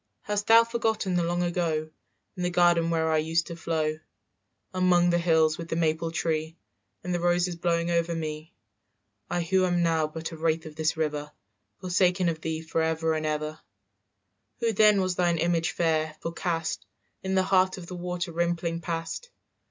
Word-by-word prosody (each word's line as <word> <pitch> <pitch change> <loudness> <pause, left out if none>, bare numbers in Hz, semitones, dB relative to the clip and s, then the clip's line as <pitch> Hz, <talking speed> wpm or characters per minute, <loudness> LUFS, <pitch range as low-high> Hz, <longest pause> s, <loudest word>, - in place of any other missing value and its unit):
"Hast 205 0 -2
thou 230 +1 +8
forgotten 225 -4 -1
the 175 - +2
long 175 +1 0
ago 165 -3 -1 0.4
In 180 - -6
the 180 - +1
garden 175 -1 +3
where 160 -1 +1
I 155 - +3
used 160 +2 0
to 170 - -7
flow, 160 -2 -1 0.7
"Among 180 -1 +3
the 175 - +2
hills, 160 -2 +3
with 165 - -6
the - - -1
maple 165 0 0
tree 160 0 -2 0.5
And 180 0 -2
the 175 - 0
roses 175 0 +1
blowing 170 0 0
over 170 0 +1
me? 155 0 -5 0.8
"I 175 - 0
who 185 +2 +2
am 175 -1 +2
now 160 -2 +2
but 160 +2 -6
a 165 - -8
wraith 160 0 0
of 155 -1 -9
this 160 +1 0
river, 150 -1 -2 0.5
Forsaken 180 0 +2
of 160 -1 -4
thee 160 0 -3
forever 160 0 0
and 155 0 -1
ever, 155 0 -3 1.0
"Who 230 -1 +1
then 210 -1 +5
was 185 -1 -1
thine 175 -1 +2
image 165 0 +1
fair, 160 -2 0
forecast 165 -1 -3 0.4
In 190 0 -2
the 190 - +4
heart 185 0 +2
of 180 - -8
the 180 - -7
water 180 0 -4
rimpling 170 0 -1
past. 165 - -4
170 Hz, 175 wpm, -27 LUFS, 160-180 Hz, 1.0 s, thou